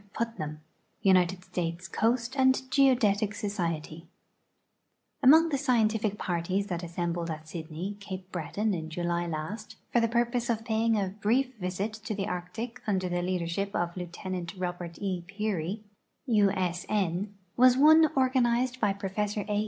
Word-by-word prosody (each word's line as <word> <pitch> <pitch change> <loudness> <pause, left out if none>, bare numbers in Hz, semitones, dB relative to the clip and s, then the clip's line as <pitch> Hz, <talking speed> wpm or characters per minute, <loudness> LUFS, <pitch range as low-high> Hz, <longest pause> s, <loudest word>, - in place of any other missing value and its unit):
Putnam, 155 -10 -3 0.4
United 185 -1 +3
Stales 175 0 -3
Coast 235 +5 0
and 260 -1 +4
Geodetic 225 -7 +3
Survey 170 -6 -3 1.1
Among 315 +5 +7
the 280 -3 0
scientific 225 -6 +2
i>arties 185 +3 -1
that 175 -2 -2
assenihlcd 170 0 -3
at 155 0 -5
Sy(hie\', 170 +5 -6
Ca|)e 190 -2 -6
Breton, 195 +6 -1
in 160 -3 -4
July 175 +1 -1
hist, 165 +8 -5 0.2
for 240 - +5
the 230 - +3
purpose 240 +1 0
of 225 -1 -1
paying 225 0 +2
a 195 -2 0
brief 250 +5 +2
visit 190 +3 -3
to 215 0 -5
the 195 -1 -2
Arctic 225 +8 -5
under 190 -3 +1
the 175 0 0
leadership 180 +2 -2
of 175 0 -1
Lieutenant 180 0 -5
Robert 175 -2 -4
E. 185 -3 -2
Pear}', 200 -1 -2 0.4
U. 210 -6 +4
S. 180 -2 -1
N., 200 0 -1 0.2
was 250 0 +6
one 315 +2 +7
organized 255 -1 +2
by 205 -2 +3
Professor 200 +1 -2
A. 205 -1 0
200 Hz, 145 wpm, -29 LUFS, 175-230 Hz, 1.1 s, Among